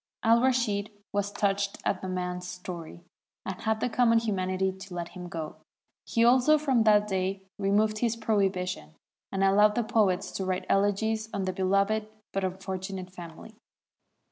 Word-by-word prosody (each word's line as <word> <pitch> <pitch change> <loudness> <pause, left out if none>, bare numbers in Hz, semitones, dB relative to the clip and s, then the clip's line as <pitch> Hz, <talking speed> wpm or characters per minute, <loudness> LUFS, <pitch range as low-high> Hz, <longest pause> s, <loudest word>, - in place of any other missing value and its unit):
" - - -64
Al 230 +1 +5
Rashid 235 -6 +1 0.2
was 205 0 0
touched 200 0 0
at - - 0
the 185 - -4
man's 180 -1 -3
story, 175 -2 -8 0.4
and 190 -1 -5
had 220 0 0
the - - +2
common 235 -1 +3
humanity 190 -4 0
to 190 -1 -10
let 170 -1 -4
him 180 -1 -8
go; 160 -2 -5 0.5
he 230 0 +3
also 255 +5 +5
from 265 -7 +2
that 210 -1 +5
day 190 0 -1 0.2
removed 210 +2 +2
his 235 -1 +1
prohibition, 190 - -1 0.4
and 195 0 0
allowed 210 +2 +5
the 240 - +1
poets 215 -5 +1
to 195 - -3
write 185 -1 -2
elegies 215 +2 +1
on 200 -2 -2
the 185 - -1
beloved 200 +3 +1 0.3
but 195 - -1
unfortunate 190 0 -4
family. 175 +3 -10
195 Hz, 165 wpm, -28 LUFS, 185-220 Hz, 0.5 s, Al